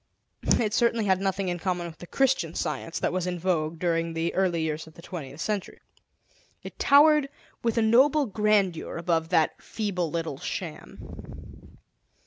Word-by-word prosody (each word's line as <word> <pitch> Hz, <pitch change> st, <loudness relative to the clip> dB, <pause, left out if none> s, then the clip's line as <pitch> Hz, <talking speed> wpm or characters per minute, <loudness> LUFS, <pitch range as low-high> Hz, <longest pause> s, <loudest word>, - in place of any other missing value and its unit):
It 215 Hz, -3 st, 0 dB
certainly 235 Hz, -2 st, +2 dB
had 190 Hz, -1 st, +2 dB
nothing 195 Hz, 0 st, -1 dB
in 175 Hz, -1 st, -2 dB
common 180 Hz, -1 st, -2 dB
with 165 Hz, -1 st, -9 dB
the 175 Hz, -, -10 dB
"Christian 260 Hz, -, +1 dB
Science" 165 Hz, -, -3 dB
that -, -, -1 dB
was 180 Hz, -1 st, -1 dB
in 180 Hz, 0 st, -2 dB
vogue 165 Hz, -2 st, -1 dB
during 165 Hz, -1 st, 0 dB
the 165 Hz, +1 st, -1 dB
early 180 Hz, -4 st, +1 dB
years 160 Hz, 0 st, -3 dB
of 160 Hz, -, -15 dB
the -, -, -12 dB
twentieth 150 Hz, -6 st, -8 dB
Century; 205 Hz, +2 st, -3 dB, 0.8 s
it -, -, -10 dB
towered 295 Hz, 0 st, +5 dB, 0.3 s
with 230 Hz, -1 st, 0 dB
a 230 Hz, -, +3 dB
noble 270 Hz, +6 st, +4 dB
grandeur 205 Hz, -7 st, +1 dB
above 165 Hz, -1 st, 0 dB
that 160 Hz, -, +1 dB
feeble 190 Hz, -6 st, -2 dB
little 160 Hz, -3 st, -3 dB
sham. -, -, -8 dB
180 Hz, 160 wpm, -26 LUFS, 165-215 Hz, 0.8 s, towered